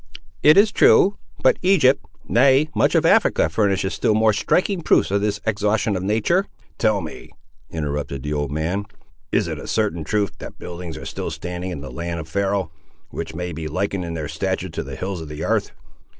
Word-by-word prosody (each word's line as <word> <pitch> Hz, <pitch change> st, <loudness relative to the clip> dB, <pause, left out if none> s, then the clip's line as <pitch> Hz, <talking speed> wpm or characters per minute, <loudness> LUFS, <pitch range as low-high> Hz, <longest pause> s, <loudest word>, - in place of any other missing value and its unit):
"It 150 Hz, +4 st, +7 dB
is 205 Hz, +1 st, +6 dB
true; 200 Hz, +2 st, +5 dB, 0.3 s
but -, -, +4 dB
Egypt—nay 135 Hz, -, +3 dB
much -, -, +2 dB
of -, -, +3 dB
Africa 80 Hz, -, +4 dB
furnishes 100 Hz, +1 st, 0 dB
still 105 Hz, -, +1 dB
more 110 Hz, 0 st, +4 dB
striking 180 Hz, -, +1 dB
proofs 155 Hz, -, +3 dB
of 100 Hz, 0 st, +1 dB
this 105 Hz, 0 st, -1 dB
exhaustion 105 Hz, -1 st, +1 dB
of 90 Hz, -, -2 dB
nature." 110 Hz, -, +1 dB, 0.3 s
"Tell 110 Hz, -3 st, +2 dB
me," 80 Hz, -, -9 dB, 0.4 s
interrupted 75 Hz, -4 st, -4 dB
the 75 Hz, -, -3 dB
old 75 Hz, -2 st, -1 dB
man, 85 Hz, +7 st, -2 dB, 0.4 s
"is -, -, +1 dB
it -, -, -4 dB
a -, -, -8 dB
certain 105 Hz, -7 st, 0 dB
truth 100 Hz, +3 st, 0 dB
that -, -, -9 dB
buildings 85 Hz, -2 st, -7 dB
are -, -, -8 dB
still -, -, -4 dB
standing 90 Hz, +3 st, -5 dB
in 85 Hz, -6 st, -5 dB
that 70 Hz, -, -8 dB
land 85 Hz, 0 st, -4 dB
of 80 Hz, -, -7 dB
Pharaoh, 95 Hz, -1 st, -1 dB, 0.4 s
which -, -, -6 dB
may 90 Hz, 0 st, -4 dB
be 80 Hz, 0 st, -5 dB
likened, 95 Hz, +4 st, -2 dB
in 85 Hz, -1 st, -5 dB
their 80 Hz, -2 st, -4 dB
stature, -, -, -2 dB
to -, -, -4 dB
the 70 Hz, 0 st, -7 dB
hills 95 Hz, +3 st, -4 dB
of 80 Hz, -, -8 dB
the 75 Hz, +1 st, -6 dB
'arth?" -, -, 0 dB
95 Hz, 195 wpm, -22 LUFS, 80-110 Hz, 0.4 s, It